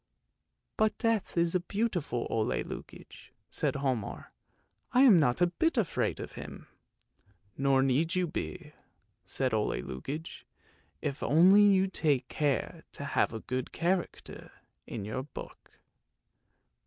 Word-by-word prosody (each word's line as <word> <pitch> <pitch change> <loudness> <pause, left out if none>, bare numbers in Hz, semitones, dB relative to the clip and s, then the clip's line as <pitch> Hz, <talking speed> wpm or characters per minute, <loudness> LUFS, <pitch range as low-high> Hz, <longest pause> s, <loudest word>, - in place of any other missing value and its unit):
" - - -52
But 215 0 +2
Death 225 -6 0
is 170 0 +2
a 185 - +3
beautiful 175 - -2
Ole 110 -1 0
Lukoie," - - -10 0.2
said - - 0
Hialmar. 130 -6 -3 0.3
" - - -39
I 255 - +7
am 220 -10 +8
not 130 0 +2
a - - +7 0.2
bit 325 -4 +3
afraid 205 -8 0
of - - -6
him! - - -9 0.5
" 100 -1 -37
"Nor 135 -1 +3
need 150 +7 +1
you 185 0 +2
be," 80 - -6 0.5
said 130 -3 +1
Ole 110 -1 0
Lukoie; 140 - -6 0.6
"if 145 -1 -3
only 185 +7 +6
you 195 -2 +5
take 150 -9 0
care 145 -3 -1
to - - -6
have - - +2
a 110 -1 -6
good 130 0 -4
character 175 +1 -2 0.4
in 105 -4 -5
your 110 +5 -3
book." 135 +1 -11
150 Hz, 140 wpm, -30 LUFS, 130-185 Hz, 0.6 s, am